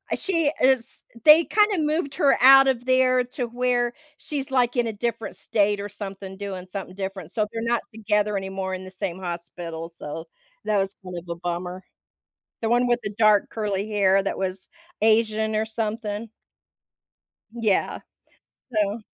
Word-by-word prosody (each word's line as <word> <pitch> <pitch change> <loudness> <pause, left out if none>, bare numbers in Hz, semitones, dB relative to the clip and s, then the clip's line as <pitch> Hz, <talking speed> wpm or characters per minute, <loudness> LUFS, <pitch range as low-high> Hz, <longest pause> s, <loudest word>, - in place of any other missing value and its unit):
she 330 -6 +1
is 260 -2 +2 0.2
they 310 +2 +8
kinda 420 -2 +3
moved 300 -2 -1
her 280 -1 +4
out 270 +1 +9
of 245 -2 0
there 255 -1 +4
to 250 0 -4
where 245 0 0 0.2
she's, 280 -3 -5
like, 250 -2 +2
in 240 -2 +1
a 225 - -3
different 230 +1 -3
state 205 -1 +1
or 205 +1 -5
something 195 -1 -7
doing 195 -3 -6
something 185 -1 -7
different. 190 -3 -5
So 215 - 0
they're 225 -1 -4
not 235 0 +1
together 210 -1 0
anymore 190 0 -4
in 185 - -5
the 185 - -10
same 185 -1 -4
hospital. 170 -2 -6
So 160 -1 -7 0.4
that 215 -1 +2
was 195 0 -1
kind 180 -1 -7
of 175 0 -9
a 170 - -2
bummer. 180 +2 -4 0.8
The 225 - 0
one 245 +1 +3
with 240 0 +2
the 205 - -4
dark 215 -2 +4
curly 210 -2 -2
hair 195 -2 +3
that 195 - -2
was 190 0 -4 0.3
Asian 220 0 +2
or 215 +1 +1
something. 220 0 -3 1.2
Yeah. 225 -5 0 0.7
So 210 0 0
215 Hz, 165 wpm, -24 LUFS, 190-240 Hz, 1.2 s, out